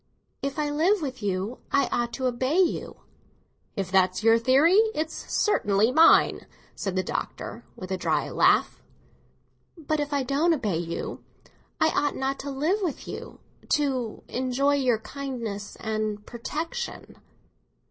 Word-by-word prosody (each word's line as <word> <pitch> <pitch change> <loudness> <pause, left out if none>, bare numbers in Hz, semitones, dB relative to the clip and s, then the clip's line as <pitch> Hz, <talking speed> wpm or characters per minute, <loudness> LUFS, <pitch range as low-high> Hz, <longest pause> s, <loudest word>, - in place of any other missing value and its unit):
"If 275 +1 -3
I 295 -1 0
live 335 +5 +2
with 260 -3 -5
you, 200 +4 -2
I 280 - +3
ought 240 0 0
to 260 - -3
obey 255 +5 0
you." 370 -3 0 0.7
"If 195 -4 -3
that's 185 +1 +3
your 225 +1 +5
theory, 280 - +5 0.2
it's 315 +1 -2 0.2
certainly 215 - +2
mine," 320 +5 +5 0.3
said 195 -2 -4
the 185 - +1
Doctor, 225 +5 -5
with 185 0 -8
a 190 - 0
dry - - 0
laugh. - - +3 1.0
"But 310 -1 -2
if 290 0 -2
I 285 -2 +1
don't 300 +6 +2
obey 210 - -1
you, 170 -1 -5 0.6
I 315 - +4
ought 290 -2 0
not 270 +1 -2
to 280 - -5
live 305 +9 0
with 340 -8 -3
you—to 260 -6 -3
enjoy 260 +3 +1
your 255 -5 +2
kindness 230 -4 -6
and 215 -1 -3
protection." 320 - -5
260 Hz, 140 wpm, -26 LUFS, 215-295 Hz, 1.0 s, your